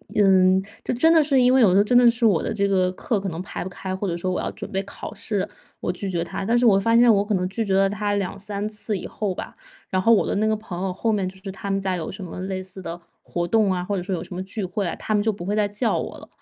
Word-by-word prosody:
嗯， 190 -2 +5 0.2
就 - - -1
真 285 +7 +4
的 325 -2 +6
是 275 -3 +3
因 250 0 +5
为 265 - +5
有 210 -6 +6
时 185 - +4
候 200 - +6
真 245 +4 +3
的 245 0 +7
是 235 +1 -4
我 200 -7 +3
的 - - -2
这 200 -2 +1
个 185 -2 +2
课 210 +4 -1
可 195 - -4
能 165 0 -5
排 185 - -5
不 185 - -5
开， 185 +1 -5
或 195 +2 -3
者 170 - -1
说 175 +2 -2
我 - - -1
要 - - -3
准 - - -8
备 195 0 -1
考 200 - -8
试， 205 -3 -2 0.3
我 - - -1
拒 180 +3 -5
绝 175 -3 -1
他， 170 +3 -5
但 230 +4 +2
是 240 0 +4
我 195 -3 +5
发 230 +3 +2
现 235 0 +7
我 200 -1 +3
可 210 - -1
能 180 -2 0
拒 225 +4 -2
绝 195 - 0
了 195 0 +4
他 205 +1 -1
2、3 200 +1 -3
次 215 0 -3
以 185 - -5
后 205 -3 -3
吧， - - -7 0.3
然 185 - 0
后 225 +5 +5
我 215 - +3
的 - - -1
那 210 +2 +1
个 220 0 +2
朋 210 -5 -7
友 190 -1 -1
后 225 +4 0
面 200 -3 0
就 185 - -7
是 190 +1 -7
他 195 +1 -5
们 195 0 0
家 190 -1 -1
有 165 -3 -4
什 195 0 -8
么 180 - -7
类 190 0 -3
似 190 0 -8
的 170 0 -6 0.2
活 175 0 -3
动 215 0 +3
啊， 180 -1 -1
或 200 +3 -2
者 185 - -2
说 190 +2 -4
有 - - -4
什 - - -10
么 180 - -4
聚 195 +2 -5
会 185 +2 -2
啊， - - -3
他 215 - -3
们 210 - +3
就 220 +1 +1
不 185 -4 -8
会 205 +2 -1
再 210 -1 +2
叫 210 +3 0
我 - - -5
了。 - - -12
195 Hz, 345 characters per minute, -23 LUFS, 185-215 Hz, 0.3 s, 的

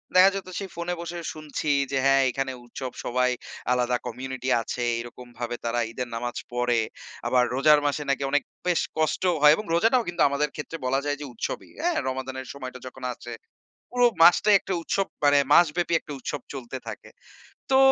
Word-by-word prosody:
দেখা 185 +1 +8
যেত 195 - -5
সেই 195 -2 -5
ফোনে 170 +1 -2
বসে 170 0 -5 0.2
শুনছি 155 -1 -4 0.2
যে 135 - +1
হ্যা, 135 0 +5
এখানে 135 +1 -2
উৎসব, 130 +1 -6
সবাই 125 +1 +2 0.4
আলাদা 125 0 +2
কমিউনিটি 130 +1 -5
আছে, 120 - -5 0.2
এরকমভাবে 120 0 -6
তারা 115 +1 0
ঈদের 125 +1 -4
নামাজ 120 +1 -3 0.2
পড়ে। 120 -1 +1 0.5
আবার 125 -1 +4
রোজার 150 +2 +6
মাসে 145 +1 -1
নাকি 140 0 +1
অনেক 145 0 +2 0.2
বেশ 175 -2 +3 0.2
কষ্ট 155 +2 0 0.2
হয় 150 0 +9
এবং 215 - -6
রোজাটাও 225 +8 +4
কিন্তু 175 0 -2
আমাদের 145 +1 0
ক্ষেত্রে 155 +2 -6
বলা 135 +2 +2
যায় 145 0 0
যে - - -4
উৎসবই, - - -4
হ্যা? 350 +2 +2 0.2
রমাদানের 130 0 -5
সময়টা 130 -2 -7
যখন 130 0 -11
আসে, 120 0 -9 0.6
পুরো 245 0 +4 0.2
মাসটাই 190 +4 +7
একটা 190 - -4
উৎসব, 195 +4 0 0.2
মানে 145 0 +6 0.2
মাসব্যাপী 170 +1 +4
একটা 150 - -8
উৎসব 145 +2 -4
চলতে 130 -1 -6
থাকে। - - -8 0.6
তো, 265 - +6
135 Hz, 175 wpm, -26 LUFS, 125-165 Hz, 0.6 s, হয়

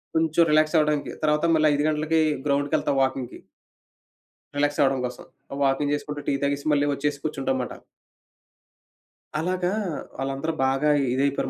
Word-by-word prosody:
కొంచెం 160 0 +2
రిలాక్స్ 155 +2 +3
అవ్వడానికి. 150 -1 +1
తర్వాత 150 +1 +2
మళ్ళా 155 -1 +4
5 145 +1 0
గంటలకి 155 +1 +1 0.3
గ్రౌండ్‌కెళ్తాం 140 0 +1
వాకింగ్‌కి. 130 -2 -2 1.2
రిలాక్స్ 145 0 0
అవ్వడం 135 -1 +3
కోసం. 125 0 -10 0.4
వాకింగ్ 140 +1 +1
చేసుకుంటూ 145 0 -5
టీ 140 - +2
తాగేసి 140 0 -1
మళ్ళీ 145 0 +2
వచ్చేసి 145 0 -2
కూర్చుంటాం 265 - -1
మాట. - - -6 1.7
అలాగా 180 +2 -1 0.5
వాళ్ళందరూ 135 +4 -2
బాగా 135 +3 +1 0.2
ఇదైపోయారు 140 0 0
145 Hz, 125 wpm, -25 LUFS, 140-155 Hz, 1.7 s, మళ్ళా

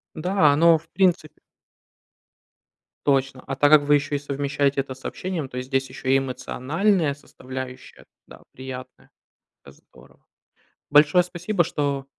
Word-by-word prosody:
Да, 160 -2 +3
оно 165 +2 +5
в 165 +2 -22
принципе 175 -5 0 1.7
Точно, 135 -2 +1
а 135 - -3
так 145 +2 +3
как 155 -1 +7
вы 145 0 +4
ещё 145 +1 -2
и 145 - +1
совмещаете 140 0 -1
это 130 -1 -5
с 130 - -19
общением, 175 -7 -4
то 125 - -5
здесь 135 0 -2
ещё 130 0 -7
и 135 - +5
эмоциональная 140 - -1
составляющая, 130 -2 -10 0.2
да, - - -15
приятная. 130 -1 -10 0.5
Это - - -14
здорово. - - -22 0.7
Большое 150 +4 +5
спасибо, 180 +2 -1
что 140 -3 -2
145 Hz, 140 wpm, -23 LUFS, 130-160 Hz, 1.7 s, как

